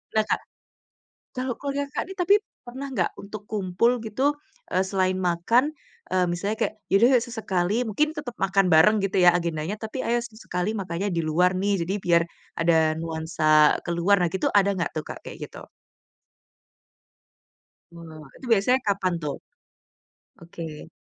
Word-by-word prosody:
Nah, 215 - +4
Kak, - - 0 1.0
kalau 255 -1 -2
keluarga 280 0 -2
Kakak - - -1
nih 385 - -7
tapi 360 +3 +3 0.3
pernah 260 +3 -7
gak 180 - +1
untuk 205 +1 -9
kumpul 205 +3 +1
gitu, 260 +7 0 0.4
eee, 185 - +3
selain 185 -1 +1
makan, 185 - +2 0.4
eee, 185 0 +2
misalnya 200 +5 -2
kayak, 220 - -1 0.2
"Ya - - +3
udah 235 +5 +5
yuk 245 - +5
sesekali," 200 -4 -1
mungkin 295 +9 +1
tetep 245 -5 -5
makan 195 0 +3
bareng 210 +8 +6
gitu 190 -1 +1
ya 175 - +8
agendanya, 170 +2 -3
tapi, 220 +4 -5
"Ayo 240 +1 +1
sesekali 215 -3 -4
makanya 195 -1 -3
di 165 - 0
luar 175 +4 +2
nih, 190 -2 0
jadi 190 - -2
biar 170 -1 +4 0.4
ada 165 0 +3 0.2
nuansa 160 -2 +3
ke 170 - -2
luar." 190 +4 +3
Nah, - - +2
gitu 190 - 0
ada 200 0 +3
gak 180 -3 -2
tuh, 155 - -2
Kak, - - -8
kayak - - -9
gitu? - - -12 2.3
Wah, 160 -3 -11
itu - - -12
biasanya 240 +5 +4
kapan 190 -3 +1
tuh? 145 -2 -2 1.0
Oke. 165 -2 -9
195 Hz, 160 wpm, -25 LUFS, 170-220 Hz, 2.3 s, ya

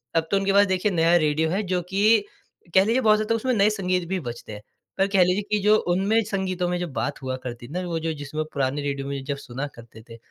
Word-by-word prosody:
अब 165 0 +1
तो 200 - +4
उनके 195 0 +1
पास 200 +1 +6
देखिए 190 +2 0
नया 170 -1 +3
रेडियो 155 0 +1
है 195 +5 -1
जो 180 -1 +1
कि 205 +4 +3 0.5
कह 190 - +6
लीजिए 235 +4 +2
बहुत 215 -3 +5
ज़्यादा 215 +2 0
उसमें 255 +3 0
नए 210 -2 +4
संगीत 185 -4 -1
भी 190 -1 -1
बजते 120 -2 -9
हैं। 105 - -9 0.4
पर 195 +1 +3
कह 195 -2 +4
लीजिए 180 +3 +1
कि 210 - +2
जो 210 +1 +5 0.2
उनमें 210 +4 +2
संगीतों 185 -2 -1
में 180 - -1
जो 175 - -2
बात - - -3
हुआ 130 0 -3
करती 120 -1 -7
थी 140 - -14
ना 180 - -2
वो 165 -1 -2
जो 160 0 -2
जिसमें 150 +1 -4
पुराने 140 +1 -1
रेडियो 140 -1 -3
में 140 -1 -4
जब 140 0 -3
सुना 135 +2 -6
करते 115 -1 -13
थे, 115 - -10
180 Hz, 255 wpm, -24 LUFS, 145-200 Hz, 0.5 s, पास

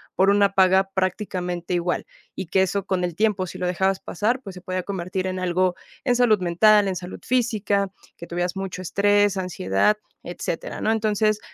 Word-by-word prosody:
por 190 +1 +4
una 200 0 +4
paga 190 0 +4
prácticamente 180 -2 -2
igual, 175 0 -1 0.3
y - - -4
que 190 +3 +2
eso 190 +1 0
con 185 -2 -1
el 175 -2 -2
tiempo, 205 -2 +1
si 185 - -8
lo 180 - -3
dejabas 190 +2 +1
pasar, 220 +8 -1
pues, 195 - -8
se 180 - -11
podía 185 0 -3
convertir 185 -1 -3
en 185 0 -2
algo 185 0 +1 0.3
de 245 - +3
salud 240 -4 +4
mental, 200 +4 +4
en 190 - -1
salud 180 0 -7
física, 215 -5 +1 0.3
que 170 - -9
tuvieras 175 +2 -2
mucho 190 -1 -5
estrés, 205 +2 +3
ansiedad, 180 - +1 0.3
etcétera, - - -5
¿no? 220 - +2
Entonces, 215 -1 +1
190 Hz, 180 wpm, -23 LUFS, 180-205 Hz, 0.3 s, por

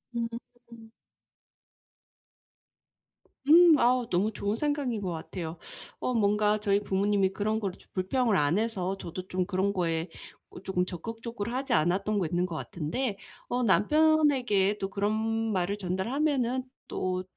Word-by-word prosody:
음. 235 -1 -7 2.5
음. 330 +1 +8
아우 245 -1 +2
너무 195 +5 +1
좋은 205 +1 -2
생각인 280 -4 -1
것 185 -3 -3
같아요. 165 0 -6 0.4
어 255 - -1
뭔가 210 -1 +2
저희 200 -1 +2
부모님이 195 0 +1
그런 215 +2 -1
거를 195 -4 -4
좀 - - -22
불평을 220 +4 +1
안 150 +1 +2
해서 195 -4 -1
저도 185 0 -7
좀 185 -1 -1
그런 190 +1 0
거에 165 -2 -1 0.4
어 - - -11
쪼끔 180 -2 0
적극적으로 225 +4 -6
하지 265 0 -1
않았던 190 +6 +1
게 175 - 0
있는 175 +1 +1
것 170 -3 -5
같은데 195 - -3 0.3
어 250 +1 -1
남편에게 250 -4 +3
또 195 - -2
그런 200 +1 -1 0.4
말을 190 +2 0
전달하면은 250 - 0 0.2
또 185 0 -2
205 Hz, 270 characters per minute, -28 LUFS, 185-240 Hz, 2.5 s, 음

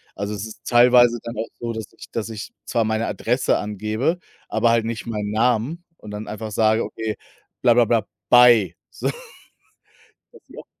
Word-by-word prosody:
Also, 100 +1 -4
es 105 +1 -5
ist 110 - -12
teilweise 120 0 +6
dann 115 -1 -7
auch 110 - -2
so, 120 -1 -2
dass 110 -1 -5
ich - - -13
dass 115 -1 -3
ich 105 -2 -7
zwar 115 -1 0
meine 110 +1 -1
Adresse 120 +5 0
angebe, 110 - -2 0.3
aber 120 - +2
halt 115 -1 +2
nicht 115 0 -4
meinen 105 -2 -3
Namen 125 +9 0
und 105 - -11
dann 105 +1 -6
einfach 110 +1 -6
sage: 110 +2 +2
„Okay, 110 -1 -4 0.5
bla 120 -2 +5
bla 120 0 +4
bla, 110 -2 +1 0.2
bye", 120 -8 +6 0.2
sodass - - -3 1.3
die - - -14
auch - - -9
115 Hz, 180 wpm, -22 LUFS, 105-120 Hz, 1.3 s, teilweise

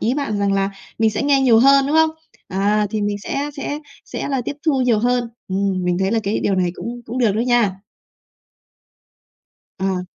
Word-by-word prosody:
Ý 235 +4 +1
bạn 275 -8 -2
rằng 200 0 +1
là 195 0 +1 0.3
mình 220 -1 +3
sẽ 210 - -2
nghe 280 -1 +3
nhiều 245 -4 +5
hơn, 275 +2 +5
đúng 300 - +1
không? 320 0 +5 0.4
À, 205 +2 +1
thì 215 - -2
mình 205 0 -1
sẽ 280 +8 -3
sẽ 285 +1 -3 0.3
sẽ - - -5
là 270 -2 0
tiếp 285 - -4
thu 280 -4 +3
nhiều 240 -4 +3
hơn. 245 +1 +1 0.2
Ừm, 190 -1 -1
mình 180 0 0
thấy 190 +1 +1
là 230 - +2
cái 205 +1 -1
điều 195 - +1
này 180 -2 +1
cũng 240 +1 -6
cũng 240 +3 -4
được 230 -5 +3
đó 215 - -1
nha. 240 -4 +2 2.1
À. 190 -1 -1
225 Hz, 205 wpm, -20 LUFS, 200-265 Hz, 2.1 s, nhiều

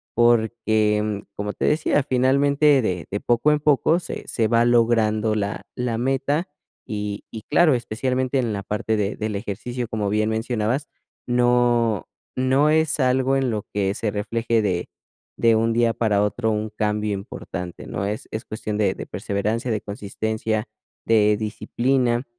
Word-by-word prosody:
porque 110 -3 +2
como 105 0 -3
te - - -2
decía, 150 -1 +2
finalmente 140 +3 +3
de 90 -6 -2
de 100 - -1
poco 120 +5 +2
en 150 - +2
poco 150 +3 +3
se - - -6
se 115 -2 0
va 115 +1 +3
logrando 115 -2 +2
la 100 -1 -3
la 125 -2 -2
meta, 135 +6 0 0.4
y 105 -1 -4
y 110 -2 -7
claro, 160 0 +4
especialmente 130 +3 -1
en 120 -3 0
la 100 -1 -4
parte 105 +2 -1
de 105 0 -1
del 110 -1 -3
ejercicio, 115 +5 -4
como 105 -2 -2
bien 105 +1 +1
mencionabas, 115 +4 -1 0.4
no 120 -3 +2 0.3
no 130 +3 +3
es 160 -1 +2
algo 130 +1 +2
en 135 -2 0
lo 105 -2 -2
que 100 -1 0
se 110 - -1
refleje 115 +2 0
de 90 -4 -1 0.5
de 115 -1 +4
un 115 +1 +2
día 115 0 +2
para 105 -3 +1
otro 110 +2 0
un 110 0 -2
cambio 105 0 -1
importante, 90 -2 -7
¿no? 100 - -3
Es 105 +2 -4
es 110 - -4
cuestión 110 -1 -4
de 100 -3 +2
de - - -6
perseverancia, 110 +5 -2
de 105 -2 -1
consistencia, 110 +1 -3 0.4
de 105 -2 +4
disciplina, 120 +3 0
115 Hz, 160 wpm, -23 LUFS, 105-125 Hz, 0.5 s, claro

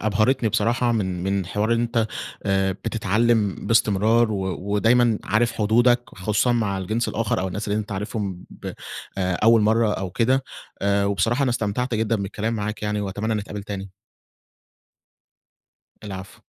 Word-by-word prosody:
أبهرتني 110 +3 +2
بصراحة، 120 +4 +1
من 95 -5 -1
من 95 -1 -1
حوار 105 +4 0
إن 115 - +2
أنت 115 -1 +1 0.4
آآ، 95 0 +1
بتتعلم 110 +1 +1
باستمرار 115 +1 +3
و 100 - -2 0.3
ودايمًا 115 +1 +3
عارف 115 +2 +2
حدودك 120 +3 +3
خصوصًا 105 +5 0
مع 105 -5 0
الجنس 110 +5 -1
الآخر، 110 -1 -1
أو 95 - -1
الناس 105 +3 -4
اللي 105 +1 +1
أنت 105 -1 -4
عارفهم 100 -2 -4
ب - - -7 0.5
أول 95 +5 +3
مرة 110 0 +3
أو 95 -2 -3
كده، 130 +7 +1 0.4
وبصراحة 100 +5 +2
أنا 130 - +2
استمتعت 120 +1 -1
جدًا 110 +1 +1
بالكلام 105 +3 -3
معاك 105 0 -4
يعني 105 0 -1
وأتمنى 105 +3 -2
نتقابل 105 -1 -4
تاني. 100 -2 -6 2.1
العفو. 95 -2 -8
105 Hz, 140 wpm, -23 LUFS, 100-115 Hz, 2.1 s, باستمرار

